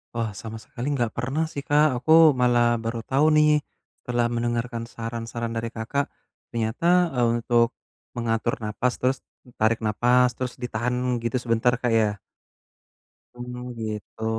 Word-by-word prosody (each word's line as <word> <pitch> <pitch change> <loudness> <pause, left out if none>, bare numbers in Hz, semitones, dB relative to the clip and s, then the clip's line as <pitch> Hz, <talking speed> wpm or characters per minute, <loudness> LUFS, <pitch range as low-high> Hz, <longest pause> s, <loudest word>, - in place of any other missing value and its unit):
Wah 115 -2 -1
sama 110 +3 -8
sekali 120 +3 -7
nggak 120 -4 0
pernah 135 +8 -1
sih - - -5
Kak, 145 -3 +3
aku 160 +3 +7
malah 120 -2 +3
baru 115 0 -4
tahu 140 +5 +2
nih, 150 0 +5 0.4
setelah 120 -1 -1
mendengarkan 120 0 -2
saran-saran 115 0 -5
dari 115 0 -3
Kakak, 115 +5 -2 0.4
ternyata, 165 +10 +1
eee, 125 -2 +2 0.2
untuk 120 0 +2 0.4
mengatur 115 +1 0
napas, 115 +4 -1
terus 130 +1 0 0.4
tarik 110 +1 +2
napas, 125 +4 +3
terus 125 +1 -5
ditahan 125 0 -2 0.2
gitu 115 +2 -3
sebentar 120 +1 +2
Kak 120 -1 -1
ya? 110 -2 +2 1.2
Mmm 125 0 -7
gitu. 110 0 -5
120 Hz, 140 wpm, -25 LUFS, 115-125 Hz, 1.2 s, aku